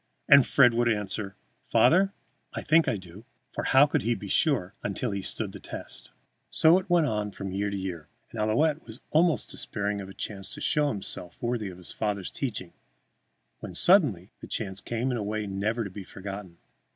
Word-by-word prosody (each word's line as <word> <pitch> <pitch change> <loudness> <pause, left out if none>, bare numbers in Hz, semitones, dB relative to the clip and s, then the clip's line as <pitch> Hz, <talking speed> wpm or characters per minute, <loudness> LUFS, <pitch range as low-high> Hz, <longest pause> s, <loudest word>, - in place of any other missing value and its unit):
And 140 -3 +8
Fred 125 -4 +6
would 120 0 +2
answer: 105 -2 -2 0.3
"Father, 190 +3 +4 0.4
I - - -3
think 160 +1 +4
I 125 -5 +1
do." 95 +3 -12 0.3
For - - -3
how 135 +2 +6
could 145 - 0
he 120 +1 +1
be 100 - -8
sure 115 - +2
until 105 +3 -2
he 100 - -2
had 95 - -5
stood - - -3
the - - -9
test? - - -9 0.4
So 165 +3 +5
it 185 - -10
went 175 -2 +4
on 105 -5 -1
from 100 -1 -6
year 100 +2 -1
to 100 - -3
year, 90 -5 -5 0.2
and 110 - -4
Ouillette 145 +9 +2
was 110 +2 -10
almost 165 +1 +2
despairing 100 -1 -3
of 95 - -8
a 95 - -11
chance 95 -2 -6
to - - -8
show 150 -1 +2
himself 95 -7 -5
worthy 120 -4 -2
of 90 - -10
his 90 - -9
father's 105 -3 -2
teaching, 105 -10 -4 0.9
when, - - -8
suddenly, 135 - +4
the - - -9
chance 100 -3 -3
came 120 +3 -2
in 125 - -1
a 105 - -2
way 105 +1 -2
never 105 +4 -1
to 100 - -6
be 100 +1 -7
forgotten. 95 -2 -8
105 Hz, 200 wpm, -28 LUFS, 95-135 Hz, 0.9 s, And